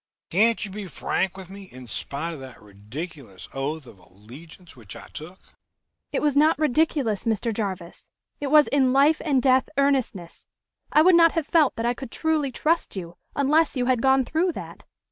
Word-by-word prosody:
Can't 220 +4 +2
you 200 - -9
be 205 0 -7
frank 190 +3 -2
with 190 -2 -9
me, 195 +1 -11
in 130 -8 -12
spite 140 - -5
of 155 - -9
that 130 -1 -11
ridiculous 105 - -10
oath 145 +2 -4
of 105 -6 -15
allegiance 130 - -15
which 110 -6 -11
I - - -11
took?" 170 +5 -9 0.7
"It - - -2
was 295 -2 +1
not 305 +3 +4
ridiculous, 290 - 0
Mr. 225 0 -1
Jarvis. 190 -5 -5 0.3
It 285 - -3
was 300 +1 +5
in 265 -2 +2
life 290 +4 +4
and 275 -5 +1
death 260 -1 +3
earnestness. 260 -11 -1 0.4
I 305 - +5
would 370 +2 +6
not 335 -1 +6
have 325 -3 -1
felt 310 -3 +2
that 230 - -3
I 240 - +1
could 260 0 -9
truly 310 -1 -1
trust 325 +2 -1
you 175 -3 -7 0.2
unless 295 +3 +2
you 250 - 0
had 250 -2 +1
gone 265 -1 +3
through 340 +5 0
that. - - -10
230 Hz, 185 wpm, -24 LUFS, -, 0.7 s, would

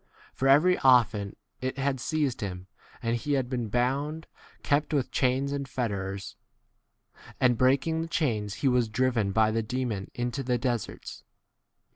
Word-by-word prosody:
For 135 - -1
very 155 +7 +5
often 110 -6 +3 0.3
it 130 +1 -3
had 135 -1 0
seized 140 -1 -1
him,' 90 -3 -5 0.4
and 115 0 +1
he 145 +5 -2
had 135 -3 +1
been 120 -3 -2
bound, 140 +7 -1 0.4
kept 150 +1 +1
with 135 -3 0
chains 130 +2 +1
and 140 -1 -3
fetters, 100 -6 -3 1.0
and 125 -2 +4
breaking 135 +7 +2
the 165 - -4
chains 110 - -1
he - - +6
was 125 -3 +2
driven 115 -3 +1
by 110 +1 +3
the 115 +1 0
demon 110 -4 -3
into 120 +3 -2
the 125 -1 0
deserts. 120 -3 -4
125 Hz, 150 wpm, -28 LUFS, 110-140 Hz, 1.0 s, he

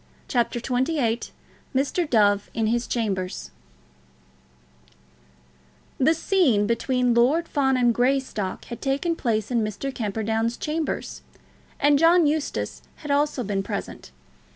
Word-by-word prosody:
CHAPTER 240 -2 0
XXVIII 245 -1 -1 0.5
Mr. 290 +5 0
Dove 205 -3 +3
in 225 - +1
His 235 +2 0
Chambers 190 - -3 2.5
The 315 +5 +4
scene 310 - +2
between 245 +2 +1
Lord 275 +8 +3
Fawn 265 -3 +1
and 240 -1 +3
Greystock 245 -6 -1
had 235 - -8
taken 280 +5 0
place 220 -6 -1
in 235 -2 +2
Mr. 215 +6 -4
Camperdown's 225 +1 -1
chambers, 310 0 -3 0.6
and 290 0 +4
John 335 +1 +5
Eustace 300 0 -2
had 295 - -6
also 285 -2 +1
been 200 -2 -1
present. - - -6
245 Hz, 115 wpm, -24 LUFS, 225-290 Hz, 2.5 s, John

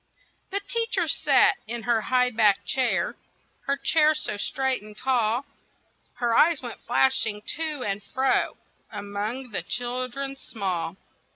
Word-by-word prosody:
THE 400 +1 0
teacher 460 +3 -1
sat - - +4
in 235 0 -4
her 235 -1 +2
high 250 +2 +2
backed 215 -3 +3
chair, 260 -2 +1 0.5
Her 280 0 +1
chair 310 +1 +4
so 305 - -3
straight 265 +5 -1
and 210 0 -13
tall; 250 0 +1 0.7
Her 240 -2 +1
eyes 330 +1 +5
went 240 -3 -7
flashing 235 -4 +1
to 310 -4 -2
and 200 0 -2
fro 260 +6 0 0.3
Among 210 +5 -4
the 200 - -2
children 255 +3 -2
small. 190 -8 -3
250 Hz, 130 wpm, -26 LUFS, 215-270 Hz, 0.7 s, eyes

